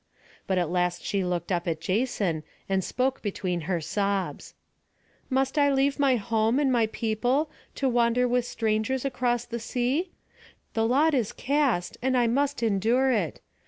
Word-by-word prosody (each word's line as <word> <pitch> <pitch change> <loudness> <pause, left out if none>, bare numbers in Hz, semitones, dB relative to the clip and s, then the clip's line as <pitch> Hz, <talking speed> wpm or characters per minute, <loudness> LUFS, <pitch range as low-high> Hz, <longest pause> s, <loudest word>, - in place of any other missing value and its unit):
But 190 - +1
at 175 -2 0
last 180 -1 0
she 200 -2 -1
looked 180 0 -2
up 175 -1 -1
at 160 -2 -1
Jason, 190 -3 0 0.3
and 190 -1 0
spoke 260 +6 -1
between 185 -4 -2
her 175 -3 +1
sobs: 200 +3 -2 0.7
"Must 270 +2 +1
I 285 -1 +4
leave 275 +1 +1
my 275 -2 +4
home 225 +1 +1
and 280 -2 +2
my 235 -3 +3
people, 245 +7 0 0.2
to 275 - 0
wander 240 0 +2
with 245 0 +1
strangers 225 +4 -1
across 245 -3 0
the 235 0 -5
sea? 255 +9 -1 0.6
The 225 0 +1
lot 295 +6 +3
is 240 -6 +1
cast, 270 -10 0
and 260 +1 +1
I 245 - +4
must 275 +2 0
endure 230 +5 +2
it. 200 - -1
235 Hz, 160 wpm, -27 LUFS, 195-265 Hz, 0.7 s, I